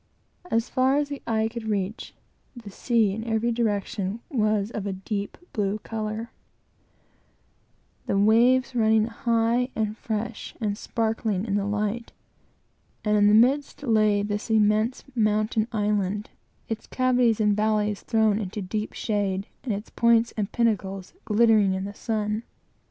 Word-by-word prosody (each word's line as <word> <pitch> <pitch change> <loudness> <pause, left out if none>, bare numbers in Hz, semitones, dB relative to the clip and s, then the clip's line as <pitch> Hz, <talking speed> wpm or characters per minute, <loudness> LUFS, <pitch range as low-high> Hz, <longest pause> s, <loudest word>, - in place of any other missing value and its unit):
As 230 +1 +1
far 260 +1 +2
as 290 -1 0
the 285 -1 -6
eye 220 -1 +1
could 225 0 -7
reach, 205 0 -3 0.4
the 225 -4 -10
sea 225 -1 +1
in 220 +3 -4
every 230 +1 0
direction 210 -2 -1
was 215 -4 +1
of 205 -3 -4
a 195 - -2
deep 200 +1 -4 0.2
blue 205 -1 0
color, 220 +1 -4 1.8
the - - +1
waves 240 +6 +4
running 220 -2 +3
high 235 +1 +1
and 215 -1 -1
fresh, 220 +1 -4
and 210 -3 -1
sparkling 220 -3 -1
in 205 - -2
the 200 0 0
light, 210 +3 -2 0.9
and 210 0 +3
in 205 -1 +5
the 210 - +6
midst 275 +5 +3
lay 215 -4 +3
this 205 +1 -3
immense 215 +2 +2
mountain 215 -1 +1
island, 210 -2 -1 0.4
its 225 -1 -5
cavities 250 -3 +2
and 210 -1 +3
valleys 210 -1 0
thrown 220 -2 +2
into 205 0 -4
deep 210 +3 -3
shade, 200 -3 -1 0.2
and 250 - -2
its 205 +1 -4
points 235 0 +3
and 210 -1 -2
pinnacles 195 -5 -1
glittering 215 -3 +4
in 190 - -3
the 200 +1 -5
sun. 215 0 -2
215 Hz, 145 wpm, -25 LUFS, 205-230 Hz, 1.8 s, the